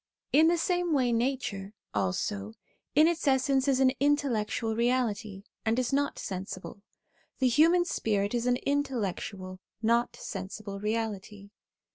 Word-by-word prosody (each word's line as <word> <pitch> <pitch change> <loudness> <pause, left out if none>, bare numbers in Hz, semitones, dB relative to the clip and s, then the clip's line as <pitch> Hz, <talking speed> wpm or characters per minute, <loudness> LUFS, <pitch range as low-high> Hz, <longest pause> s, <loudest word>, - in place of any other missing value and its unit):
In 310 +3 +6
the 340 +1 +3
same 350 0 0
way 255 -4 +2
nature, 230 -5 -1 0.2
also, 100 +1 -2 0.4
in 305 +2 +7
its 335 -3 -1
essence 265 0 +3
is 265 -2 +3
an 260 -1 +5
intellectual 240 -6 +1
reality, 225 -4 0 0.2
and 225 +1 +1
is 255 +1 0
not 285 +1 +1
sensible; 190 +1 -6 0.6
the 260 - +2
human 330 +8 +4
spirit 205 - 0
is 240 0 0
an 245 0 +3
intellectual, 210 -9 -2 0.2
not 235 +2 +1
sensible 200 0 -6
reality. 210 -2 -3
235 Hz, 130 wpm, -29 LUFS, 200-275 Hz, 0.6 s, in